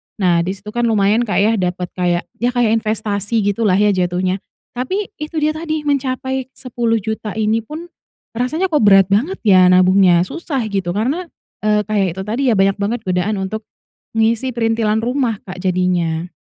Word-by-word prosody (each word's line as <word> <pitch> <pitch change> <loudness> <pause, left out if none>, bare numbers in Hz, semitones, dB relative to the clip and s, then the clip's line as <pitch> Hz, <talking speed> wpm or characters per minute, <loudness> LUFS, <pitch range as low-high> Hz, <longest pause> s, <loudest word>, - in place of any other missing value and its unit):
Nah 180 -4 +2
di 190 +2 -2
situ 210 +2 -10
kan 240 0 0
lumayan, 215 +1 +2
Kak, - - -1
ya 215 +2 +3
dapet 180 0 -2
kayak, 175 -1 0 0.2
ya 240 +2 +1
kayak 225 -2 +3
investasi 215 0 -1
gitulah 205 -1 +1
ya 210 0 +3
jatuhnya. 185 +1 0 0.4
Tapi, 375 +12 -2
itu 305 +1 -4
dia 305 +1 0
tadi 310 -2 -3
mencapai 260 -1 -2
Rp10.000.000 225 -4 -2
ini 220 +1 0
pun, 315 +7 -8 0.5
rasanya 310 +10 0
kok 300 -9 +1
berat 195 -2 +6
banget 245 - 0
ya 185 -3 +6
nabungnya 185 -1 +5
susah 330 -5 -4
gitu. 195 -4 -2
Karena, 270 - -1 0.4
eee, 210 0 +3
kayak 205 -3 +1
itu 190 - -5
tadi 230 +5 -2
ya - - +2
banyak 195 0 +3
banget 220 +4 -1
godaan 190 +3 0
untuk 215 +3 -4 0.5
ngisi 230 +3 +1
perintilan 225 -2 +1
rumah, 245 -3 -1
Kak, 185 0 -7
jadinya. 180 -2 0
215 Hz, 170 wpm, -18 LUFS, 190-245 Hz, 0.5 s, berat